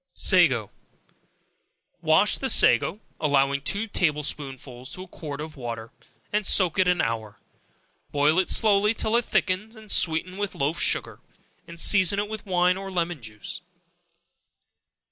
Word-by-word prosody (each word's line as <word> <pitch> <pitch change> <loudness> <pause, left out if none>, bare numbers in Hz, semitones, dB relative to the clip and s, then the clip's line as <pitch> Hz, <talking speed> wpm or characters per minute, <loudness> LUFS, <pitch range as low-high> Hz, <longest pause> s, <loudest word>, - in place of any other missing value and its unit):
Sago. 135 - +3 1.3
Wash, - - +3
the - - -2
sago, 190 - +3 0.2
(allowing 140 -2 +1
two 200 +9 -2
table 155 -8 -1
spoonsful 135 -4 -5
to 185 - -7
a - - -14
quart 145 -5 -8
of 155 0 -8
water,) 115 -4 -7 0.4
and 210 0 +1
soak 185 -2 +4
it 185 - +3
an 180 -1 +2
hour; 110 -2 -4 0.7
boil 150 +4 +2
it 185 - 0
slowly 210 0 +4
till 220 - -1
it 240 0 +1
thickens; 210 +4 -2 0.2
sweeten 165 +2 +2
it - - -11
with 205 -1 -4
loaf 145 +4 -2
sugar, - - -1 0.5
and 170 0 -11
season 190 +1 +4
it 205 +1 -2
with 215 -1 -8
wine 180 0 +1
or 195 0 -7
lemon 175 -4 -3
juice. 115 - -8
170 Hz, 145 wpm, -24 LUFS, 140-195 Hz, 1.3 s, soak